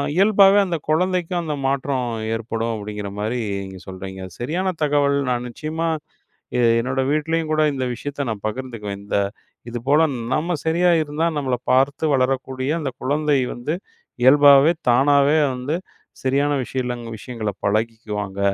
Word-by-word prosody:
இயல்பாவே 200 Hz, +1 st, +6 dB
அந்த 175 Hz, -3 st, -1 dB
குழந்தைக்கும் 180 Hz, +1 st, +1 dB
அந்த 150 Hz, -2 st, -2 dB
மாற்றம் 135 Hz, -2 st, -1 dB, 0.3 s
ஏற்படும் 115 Hz, 0 st, -2 dB
அப்டிங்கிற 105 Hz, -1 st, -5 dB
மாரி 110 Hz, +4 st, -1 dB, 0.2 s
நீங்க 95 Hz, -1 st, -9 dB
சொல்றீங்க. 95 Hz, 0 st, -7 dB, 0.2 s
சரியான 180 Hz, +9 st, -1 dB
தகவல் 145 Hz, -1 st, +2 dB
நான் 120 Hz, 0 st, -1 dB
நிச்சயமா 160 Hz, +6 st, -3 dB, 0.7 s
இது 120 Hz, -, +3 dB
என்னோட 130 Hz, +2 st, -1 dB
வீட்லேயும் 160 Hz, +1 st, 0 dB
கூட 155 Hz, -, +2 dB
இந்த 130 Hz, -1 st, -2 dB
விஷயத்த 145 Hz, +2 st, -4 dB
நான் 105 Hz, -3 st, -5 dB
பகிர்ந்துக்குவேன். 110 Hz, -4 st, -5 dB
இந்த 100 Hz, -, -1 dB, 0.5 s
இது 120 Hz, 0 st, -4 dB
போல 150 Hz, +2 st, +5 dB, 0.3 s
நம்ம 170 Hz, +4 st, 0 dB
சரியா 175 Hz, +2 st, +3 dB
இருந்தா 150 Hz, +3 st, -1 dB
நம்மள 130 Hz, -3 st, 0 dB, 0.2 s
பார்த்து 135 Hz, +4 st, +2 dB
வளரக்கூடிய 130 Hz, +1 st, -1 dB
அந்த 135 Hz, -3 st, -2 dB
குழந்தை 145 Hz, +1 st, +1 dB
வந்து 125 Hz, +7 st, -3 dB, 0.5 s
இயல்பாவே 145 Hz, +3 st, +7 dB, 0.2 s
தானாவே 140 Hz, +4 st, +4 dB, 0.2 s
வந்து 130 Hz, +5 st, -2 dB, 0.5 s
சரியான 140 Hz, +2 st, +2 dB
விஷயங்க 125 Hz, -3 st, -4 dB
விஷயங்கள 110 Hz, -1 st, -5 dB
பழகிக்குவாங்க. 105 Hz, -2 st, -2 dB
135 Hz, 135 wpm, -21 LUFS, 115-155 Hz, 0.7 s, இயல்பாவே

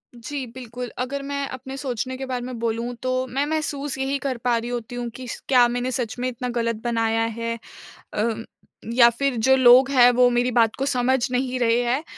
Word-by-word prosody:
जी, 265 Hz, +3 st, -5 dB
बिल्कुल, 245 Hz, -1 st, -7 dB
अगर 270 Hz, +3 st, -2 dB
मैं 280 Hz, 0 st, -3 dB
अपने 265 Hz, +1 st, -7 dB
सोचने 260 Hz, -1 st, -3 dB
के 265 Hz, -, -5 dB
बारे 250 Hz, -2 st, -4 dB
में 250 Hz, -1 st, -6 dB
बोलूँ 230 Hz, +1 st, -2 dB
तो 255 Hz, 0 st, 0 dB
मैं 270 Hz, +3 st, -1 dB
महसूस 290 Hz, -3 st, -2 dB
यही 270 Hz, +1 st, -1 dB
कर 260 Hz, -3 st, -1 dB
पा 245 Hz, -1 st, +2 dB
रही 235 Hz, +1 st, -4 dB
होती 245 Hz, 0 st, -5 dB
हूँ 240 Hz, -1 st, -3 dB
कि 255 Hz, 0 st, -8 dB
स -, -, -6 dB
क्या 245 Hz, -1 st, +7 dB
मैंने 245 Hz, +1 st, -2 dB
सच 240 Hz, -3 st, -3 dB
में 250 Hz, -, -1 dB
इतना 250 Hz, 0 st, -5 dB
ग़लत 230 Hz, 0 st, 0 dB
बनाया 225 Hz, -1 st, +1 dB, 0.2 s
है। 230 Hz, 0 st, -2 dB, 0.6 s
अ, 225 Hz, +2 st, 0 dB, 0.6 s
या 235 Hz, -1 st, +7 dB
फ़िर 270 Hz, +3 st, -1 dB
जो 260 Hz, +4 st, +4 dB
लोग 260 Hz, +1 st, +7 dB
हैं 245 Hz, -3 st, +7 dB
वो 245 Hz, 0 st, +4 dB
मेरी 245 Hz, +1 st, +1 dB
बात 230 Hz, -2 st, +3 dB
को 270 Hz, -, -1 dB
समझ 260 Hz, -1 st, +2 dB
नहीं 255 Hz, 0 st, -1 dB
रहे 235 Hz, -1 st, +3 dB
हैं। 250 Hz, +5 st, 0 dB
250 Hz, 210 wpm, -23 LUFS, 235-265 Hz, 0.6 s, क्या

